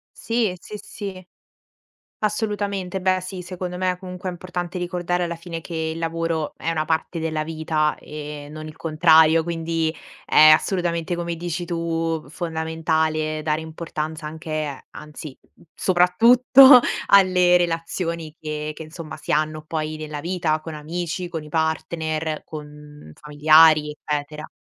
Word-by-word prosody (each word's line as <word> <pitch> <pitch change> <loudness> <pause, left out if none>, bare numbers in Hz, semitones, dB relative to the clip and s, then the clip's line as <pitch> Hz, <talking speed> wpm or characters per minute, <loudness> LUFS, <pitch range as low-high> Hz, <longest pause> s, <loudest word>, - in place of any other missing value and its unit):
Sì, 225 -5 -1
sì, 210 +3 -9
sì. 190 -4 -8 0.9
Assolutamente. 205 -3 -2
Beh 185 0 +1
sì, 185 0 -7
secondo 180 0 -6
me 185 0 0
comunque 185 0 -7
è 185 - -1
importante 175 0 -5
ricordare 175 0 -1
alla 170 0 -3
fine 170 0 -7
che 170 - -9 0.2
il - - -8
lavoro 165 -1 -2
è - - -3
una 155 -1 0
parte 160 +2 -2
della 155 -1 -2
vita 155 -1 -1
e 150 -1 -8
non 155 0 -8
il 155 - -10
contrario, 160 0 +4
quindi, 165 -1 -2 0.3
è 155 - +7
assolutamente 170 +1 +2
come 170 0 -3
dici 175 +1 -4
tu, 165 -1 -2
fondamentale 160 -1 -1
dare 155 0 0
importanza 160 -1 -5
anche 155 -3 -5
anzi, 150 -2 -10 0.2
n - - -24
soprattutto 245 +9 +7 0.3
alle 185 -2 +5
relazioni 165 -1 -3
che 150 0 -4
che - - -10
insomma 160 0 -9
si - - -5
hanno 155 +1 0
poi 155 0 -3
nella 155 -1 -6
vita 165 -1 -1
con 160 0 -8
amici, 170 +4 -4
con 160 -3 -5
i 150 - -12
partner, 160 0 -2
con 150 - -11
familiari, 150 - +4
eccetera. 150 +1 -4
165 Hz, 140 wpm, -22 LUFS, 155-180 Hz, 0.9 s, è